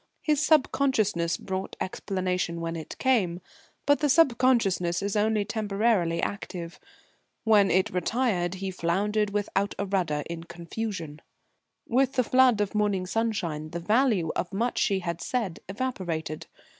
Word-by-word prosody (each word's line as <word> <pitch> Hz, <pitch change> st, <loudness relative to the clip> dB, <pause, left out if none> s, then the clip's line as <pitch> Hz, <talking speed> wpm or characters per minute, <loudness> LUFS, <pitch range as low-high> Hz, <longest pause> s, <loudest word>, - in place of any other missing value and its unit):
His 300 Hz, -2 st, +2 dB
Subconsciousness 245 Hz, -, +2 dB
brought 190 Hz, 0 st, -5 dB
explanation 185 Hz, -2 st, -2 dB
when 165 Hz, 0 st, -3 dB
it 160 Hz, -2 st, -7 dB
came 200 Hz, -10 st, +1 dB, 0.5 s
but 285 Hz, 0 st, +4 dB
the 295 Hz, -1 st, +1 dB
Subconsciousness 235 Hz, -, +3 dB
is 200 Hz, +1 st, -2 dB
only 210 Hz, 0 st, +2 dB
temporarily 205 Hz, -5 st, 0 dB
active. 175 Hz, -4 st, -5 dB, 0.6 s
When 210 Hz, -3 st, +5 dB
it 185 Hz, +1 st, +2 dB
retired 185 Hz, -1 st, 0 dB
he 190 Hz, 0 st, -4 dB
floundered 200 Hz, +5 st, 0 dB
without 200 Hz, -1 st, -1 dB
a 200 Hz, -, -1 dB
rudder, 175 Hz, -7 st, 0 dB
in 170 Hz, 0 st, -6 dB
confusion. 170 Hz, -3 st, -6 dB, 0.7 s
With 260 Hz, +2 st, +2 dB
the 255 Hz, -, +2 dB
flood 255 Hz, -3 st, +4 dB
of 205 Hz, -, -1 dB
morning 205 Hz, -3 st, +1 dB
sunshine 180 Hz, -8 st, -2 dB
the 170 Hz, -, -4 dB
value 210 Hz, -3 st, +2 dB
of 175 Hz, -, -2 dB
much 230 Hz, +5 st, -1 dB
she 195 Hz, -1 st, +1 dB
had 170 Hz, -1 st, -4 dB
said 225 Hz, -9 st, -2 dB
evaporated. 180 Hz, -, -3 dB
195 Hz, 135 wpm, -27 LUFS, 170-225 Hz, 0.7 s, When